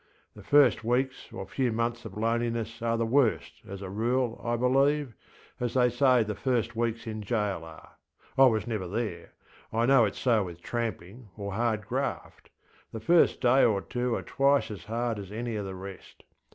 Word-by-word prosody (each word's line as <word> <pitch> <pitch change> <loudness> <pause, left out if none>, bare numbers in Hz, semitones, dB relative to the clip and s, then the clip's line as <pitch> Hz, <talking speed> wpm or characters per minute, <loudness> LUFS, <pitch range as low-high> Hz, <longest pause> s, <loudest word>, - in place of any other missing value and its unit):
The - - -11
first 145 -5 +4
weeks 130 +3 -1
or - - -6
few 130 -3 -1
months 115 +1 -2
of 105 -2 -8
loneliness 115 0 -1
are 115 0 0
the 115 - 0
worst, 120 0 +1
as 100 0 -7
a 95 - -6
rule, 120 +3 -1
I 120 0 0
believe, 135 +2 +2 0.5
as 120 0 -2
they 125 -1 +4
say 125 -1 +4
the 105 0 -3
first 120 +1 -1
weeks 115 0 -2
in 110 -1 -5
jail 105 -4 -1 0.8
areŌĆöI 135 -1 +8
was 110 -1 -1
never 110 -6 -3
there. 110 +4 -4 0.4
I 115 +1 +1
know 135 -1 +6
itŌĆÖs 100 - -3
so 115 -5 +2
with 85 -1 -10
tramping 115 -1 -5
or 100 -1 -5
hard 110 -1 -1
graft: - - -4 0.4
the 110 - -6
first 170 +10 +3
day 130 +2 +5
or 105 -4 +3
two 125 +3 -2
are - - -4
twice 140 -3 +2
as 95 -5 -8
hard 115 0 -2
as 100 -1 -8
any 115 +1 -4
of 105 -2 -3
the 95 - -6
rest. 95 +1 -11
115 Hz, 185 wpm, -28 LUFS, 105-125 Hz, 0.8 s, areŌĆöI